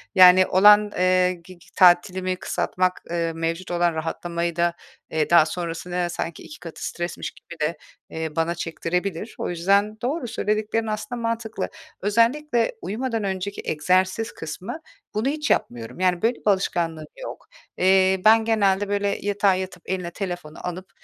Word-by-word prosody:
yani 185 0 +8
olan, 210 +2 +6
eee, 185 0 +3
gi 175 0 -14
gi - - -21
tatilimi 185 +1 +4
kısaltmak, 185 0 -1
eee, 170 -1 -1
mevcut 165 +3 -3
olan 175 -1 +2
rahatlamayı 170 +1 -3
da, 170 0 +1 0.4
eee, 155 -1 0
daha 170 -2 +7
sonrasında 175 +1 -3
sanki 170 -1 -5
2 305 - -11
katı 165 -2 -8
stresmiş 175 0 -4
gibi 170 - -14
de, 155 +2 0 0.3
eee, 160 -1 -5
bana 165 +1 0
çektirebilir. 175 +4 -3
O - - -3
yüzden 200 +5 +1
doğru, 260 +2 -2
söylediklerin 215 +1 -1
aslında 220 +3 -4
mantıklı. 230 -3 -3 0.3
Özellikle 235 - +2
uyumadan 230 +1 -2
önceki 195 +1 -3
egzersiz 185 +7 +1
kısmı, 185 - -6 0.3
bunu 215 +4 0
hiç 300 +1 -1
yapmıyorum. 115 -1 -1
Yani, 180 -2 +2
böyle, 235 +2 +2
bir - - -18
alışkanlığım 170 -5 0 0.2
yok. - - -8 0.3
Eee, 190 0 +4
ben 220 +1 +6
genelde, 205 -3 +2
böyle, 205 0 0
yatağa 205 -1 +2
yatıp 185 -1 -6
eline 180 -2 -3
telefonu 175 -6 -6
alıp, 185 +2 -6
185 Hz, 150 wpm, -23 LUFS, 170-210 Hz, 0.4 s, yani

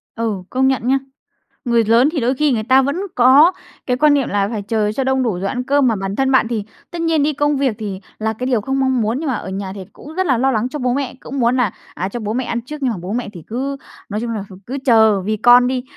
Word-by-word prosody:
Ừ, 220 -5 -2
công 265 +1 +1
nhận 260 -2 0
nha. 270 +1 +3 0.7
Người 235 -2 +3
lớn 235 +6 +4
thì 320 - -1
đôi 245 +2 +1
khi 300 +2 +2
người 225 -4 0
ta 260 +3 +5
vẫn 280 +3 -1 0.2
có 265 +7 +6 0.3
cái 250 -1 0
quan 300 +1 +4
niệm 275 -3 +1
là 200 -1 +1
phải 215 -3 -3
chờ 210 0 -1
cho 265 +5 -2
đông 265 0 +1
đủ 230 - +1
rồi 185 +2 -3
ăn 250 -1 -3
cơm, 280 0 +2
mà 225 - +2
bản 195 0 -4
thân 270 +2 +1
bạn 260 -3 +4
thì 225 -3 -2 0.3
tất 345 - -5
nhiên 325 -3 +2
đi 300 +1 +1
công 290 0 +1
việc 265 -5 0
thì 200 -3 -5 0.2
là 220 0 -1
cái 250 +4 -5
điều 240 -5 +1
không 270 +4 -2
mong 260 -2 +1
muốn, 225 +4 -1
nhưng 315 - -4
mà - - 0
ở 190 - -6
nhà 190 0 -4
thì 195 -2 -8
cũng 300 - -12
rất 375 +1 0
là 260 -4 +2
lo 265 +2 +2
lắng 230 +1 -1
cho 295 - -5
bố 250 -1 0
mẹ, 275 -2 -2
cũng 275 +1 -6
muốn 240 +1 +2
là, 240 -6 +1 0.2
à, 185 +2 -3
cho 240 - -5
bố 215 -1 -3
mẹ 255 +2 -1
ăn 235 - -2
trước 300 +6 -8
nhưng 255 - +1
mà 220 - -4
bố 185 +4 -5
mẹ 245 -1 -3
thì 170 -4 -10
cứ, 270 +5 -3 0.3
nói 210 +1 -3
chung 235 - -3
là 210 -3 -3
thì 190 - -11
cứ 265 +3 -4
chờ 220 -5 +5
vì 215 +3 -2
con 245 +2 +6
đi. 255 -1 -2
245 Hz, 295 wpm, -18 LUFS, 215-270 Hz, 0.7 s, có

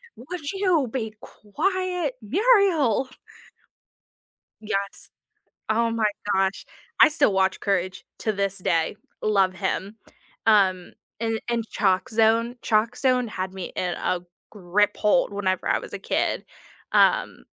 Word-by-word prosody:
"Would 295 +3 -6
you 365 -9 +2
be 220 -4 -3
quiet, 360 - -2
Muriel?" 325 - +3 1.5
Yes, 200 -2 -4 0.6
oh 230 +1 +2
my 225 -1 0 0.3
gosh, 190 0 0 0.3
I - - +8
still 285 -8 +2
watch 190 0 +1
Courage 185 -2 -1 0.2
to 220 - 0
this 195 -1 -1
day, 165 0 0 0.3
love 195 -3 +2
him, 190 +3 -3 0.5
um, 190 -5 +3 0.3
and 225 -1 -1
and 235 -1 0
Chalkzone, 225 +4 +2
Chalkzone 245 +3 +1
had 185 -2 -4
me 190 -2 -5
in 180 -1 -1
a 180 - -1 0.3
grip 205 +1 0
hold 210 +1 +2
whenever 190 -2 -1
I - - +2
was - - -11
a - - -5
kid, - - -1 0.5
um - - +2
215 Hz, 120 wpm, -24 LUFS, 190-255 Hz, 1.5 s, I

